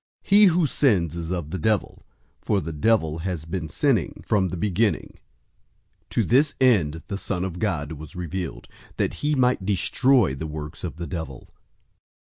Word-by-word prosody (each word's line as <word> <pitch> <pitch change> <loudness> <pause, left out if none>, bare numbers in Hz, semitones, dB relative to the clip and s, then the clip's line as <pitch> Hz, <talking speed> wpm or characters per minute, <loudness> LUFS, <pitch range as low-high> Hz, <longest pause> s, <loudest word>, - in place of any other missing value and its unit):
003:008 - - -22
He 205 +1 +8
who 175 -2 +4
sins 100 - +2
is 85 -1 -5
of 85 -4 -3
the 95 - -3
devil, 105 +4 -1 0.3
for 100 - +1
the 80 -2 -5
devil 80 -2 +1
has 85 -2 -4
been 80 -1 -4
sinning 115 - 0
from 100 -3 +2
the 90 0 -5
beginning. 105 +4 0 0.9
To - - +1
this 140 +4 +3
end 80 - +3
the 100 - -4
Son 90 -3 -2
of 90 -2 -4
God 80 -9 -1
was 80 -1 -9
revealed, 90 0 -5 0.3
that - - 0
he 150 0 +1
might 125 -6 +2
destroy 105 - +3
the 80 +4 -5
works 75 +1 -7
of 90 - -4
the 85 +1 -5
devil. 80 -7 -7
90 Hz, 170 wpm, -24 LUFS, 80-110 Hz, 0.9 s, He